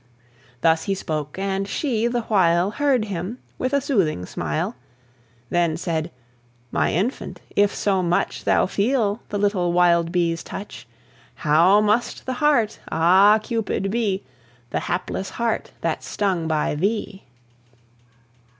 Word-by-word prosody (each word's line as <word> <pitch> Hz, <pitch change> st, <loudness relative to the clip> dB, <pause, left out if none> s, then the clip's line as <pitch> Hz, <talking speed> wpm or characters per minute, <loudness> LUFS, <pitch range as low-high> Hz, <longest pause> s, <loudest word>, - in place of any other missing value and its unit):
Thus 160 Hz, +2 st, +3 dB
he 195 Hz, -, 0 dB
spoke, 155 Hz, -4 st, -4 dB
and 195 Hz, 0 st, -2 dB
she 235 Hz, -2 st, 0 dB
the 240 Hz, 0 st, -1 dB
while 185 Hz, -3 st, +2 dB
Heard 265 Hz, -3 st, +1 dB
him 195 Hz, +3 st, -4 dB, 0.2 s
with 255 Hz, -, -1 dB
a 280 Hz, -, +3 dB
soothing 195 Hz, -, 0 dB
smile; 75 Hz, +7 st, -3 dB, 0.8 s
Then 170 Hz, -2 st, +1 dB
said, 165 Hz, -2 st, -2 dB, 0.6 s
"My -, -, +1 dB
infant, 205 Hz, -, -2 dB, 0.2 s
if 205 Hz, 0 st, +3 dB
so 195 Hz, -2 st, +1 dB
much 175 Hz, -1 st, 0 dB
Thou -, -, +3 dB
feel 210 Hz, +1 st, 0 dB
the 205 Hz, -, -2 dB
little 200 Hz, -4 st, +1 dB
wild 170 Hz, -1 st, +3 dB
bee's 170 Hz, -2 st, 0 dB
touch, 195 Hz, -11 st, -8 dB, 0.5 s
How 170 Hz, +7 st, +4 dB
must 215 Hz, +3 st, 0 dB
the 260 Hz, -, -2 dB
heart, 260 Hz, -8 st, +2 dB
ah, 190 Hz, +6 st, +5 dB
Cupid! 210 Hz, -4 st, -2 dB
be, 210 Hz, -4 st, 0 dB, 0.5 s
The -, -, 0 dB
hapless 185 Hz, +2 st, -3 dB
heart 235 Hz, -1 st, -2 dB
that's -, -, -2 dB
stung 185 Hz, -5 st, -1 dB
by 155 Hz, -2 st, 0 dB
thee!" 195 Hz, +4 st, -2 dB
195 Hz, 130 wpm, -22 LUFS, 170-215 Hz, 0.8 s, ah